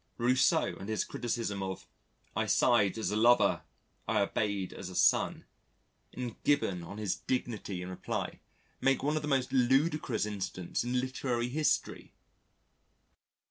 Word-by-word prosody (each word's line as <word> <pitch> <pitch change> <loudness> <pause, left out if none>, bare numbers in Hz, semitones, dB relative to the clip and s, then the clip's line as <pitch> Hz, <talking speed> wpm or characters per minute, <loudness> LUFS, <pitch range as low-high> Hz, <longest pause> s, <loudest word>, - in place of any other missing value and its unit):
Rousseau 125 +2 +2
and 100 - -7
his 110 - 0
criticism 115 -4 -3
of 95 -1 -5 0.5
"I - - 0
sighed 115 -5 +3
as 110 - -1
a - - -1
lover; 120 +3 +4 0.5
I - - +2
obeyed 100 -1 -1
as 95 - -7
a 90 - -9
son," - - +3 0.7
and 125 -3 -6
Gibbon 100 -11 +2
on 85 +5 -8
his 105 -3 -1
dignity 105 -7 -3
in 90 - -6
reply 90 - -4 0.4
make 135 0 +2
one 150 +2 +1
of 155 - 0
the 150 - -4
most 135 -3 0
ludicrous 135 -1 +2
incidents 95 -3 -3
in 125 +1 0
literary 125 -2 -2
history. 150 +4 -1
120 Hz, 140 wpm, -31 LUFS, 100-130 Hz, 0.7 s, lover